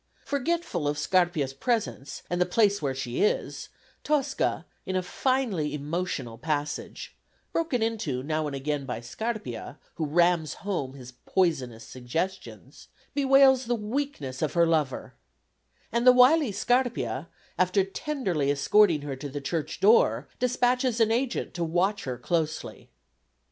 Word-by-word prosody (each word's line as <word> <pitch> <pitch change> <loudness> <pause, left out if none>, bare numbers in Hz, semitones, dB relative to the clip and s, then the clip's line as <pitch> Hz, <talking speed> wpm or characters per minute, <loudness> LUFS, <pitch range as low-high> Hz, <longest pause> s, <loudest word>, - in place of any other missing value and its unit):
Forgetful 285 - -1
of 145 0 -1
Scarpia's 155 -3 +1
presence 210 - -2
and 175 0 -1
the - - +5
place 205 +1 +2
where 135 -3 -1
she 125 -2 -3
is, 210 - 0 0.3
Tosca, 280 - 0 0.2
in 190 - -4
a 185 - +1
finely 210 - 0
emotional 145 -6 -3
passage 150 -2 -4 0.4
broken 300 -8 0
into 185 - -2
now 155 +1 -1
and 140 - -4
again 140 0 -3
by 125 -3 -3
Scarpia, 135 - -5 0.2
who 155 - -1
rams 170 0 +2
home 145 -10 -2
his 125 -2 -10 0.2
poisonous 130 -11 0
suggestions 130 +11 -5 0.3
bewails 270 -2 +5
the 240 +1 0
weakness 210 - -4
of 155 - 0
her 170 -1 +4
lover; 155 -5 -1 0.8
and 235 +2 +1
the - - +11
wily 255 +1 +5
Scarpia, 230 - 0 0.3
after 185 +2 +3
tenderly 195 - -2
escorting 155 +3 +4
her 140 -2 -4
to 140 +2 -7
the 145 +2 -5
church 155 +2 -3
door, 150 - +4
despatches 250 -1 +1
an 225 -1 +4
agent 245 +2 -1
to 175 - -2
watch 180 +5 0
her 130 -2 -3
closely. 155 +3 -3
175 Hz, 140 wpm, -27 LUFS, 145-235 Hz, 0.8 s, the